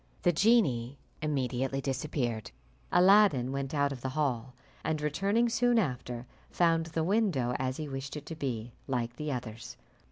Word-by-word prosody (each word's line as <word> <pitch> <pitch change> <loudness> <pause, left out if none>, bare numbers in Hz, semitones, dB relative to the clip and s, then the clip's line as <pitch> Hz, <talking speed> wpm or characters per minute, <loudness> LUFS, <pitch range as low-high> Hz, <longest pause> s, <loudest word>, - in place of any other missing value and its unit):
The 175 - +5
genie 150 - +3 0.2
immediately 135 -2 -1
disappeared. 130 -4 -2 0.4
Aladdin 180 -9 +5
went 135 0 -3
out 145 -2 +1
of 130 -3 -6
the 130 - -2
hall, 125 -4 -1 0.3
and 155 -1 0
returning 195 +10 +1
soon 240 +1 +2
after, 125 - -2 0.2
found 165 -2 +2
the 160 0 -1
window, 170 - +1
as 130 0 -1
he 155 - -4
wished 135 +1 -5
it 150 - -8
to 165 - -6
be, 120 -6 -4
like 120 -2 -2
the 150 -1 -3
others. 120 -3 -6
140 Hz, 155 wpm, -30 LUFS, 125-165 Hz, 0.4 s, The